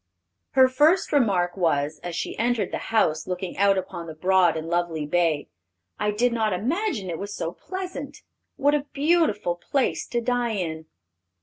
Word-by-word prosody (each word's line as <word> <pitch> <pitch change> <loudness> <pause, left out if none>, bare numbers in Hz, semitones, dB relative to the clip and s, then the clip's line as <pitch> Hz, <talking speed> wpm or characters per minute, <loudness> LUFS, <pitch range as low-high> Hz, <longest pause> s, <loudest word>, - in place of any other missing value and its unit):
Her 260 -1 +7
first 300 +8 +3
remark 190 -10 +2
was, 155 -4 0
as 175 -1 -5
she - - -3
entered 230 -4 0
the - - -2
house 155 -9 +1
looking 180 0 -4
out 200 -1 +4
upon 180 -2 -5
the 160 - -8
broad 180 0 +3
and 160 +1 -5
lovely 170 -2 -1
bay, 160 -1 +1 0.5
"I 210 - +1
did 235 +4 +1
not 220 -3 +1
imagine 245 - -1
it 165 - -4
was 205 +1 -5
so 165 - -3
pleasant! 355 - -7 0.3
What 290 0 +2
a 295 -1 0
beautiful 285 - +2
place 265 +9 -1
to 240 - -1
die 240 -1 0
in!" 160 -5 -4
200 Hz, 170 wpm, -25 LUFS, 175-255 Hz, 0.5 s, Her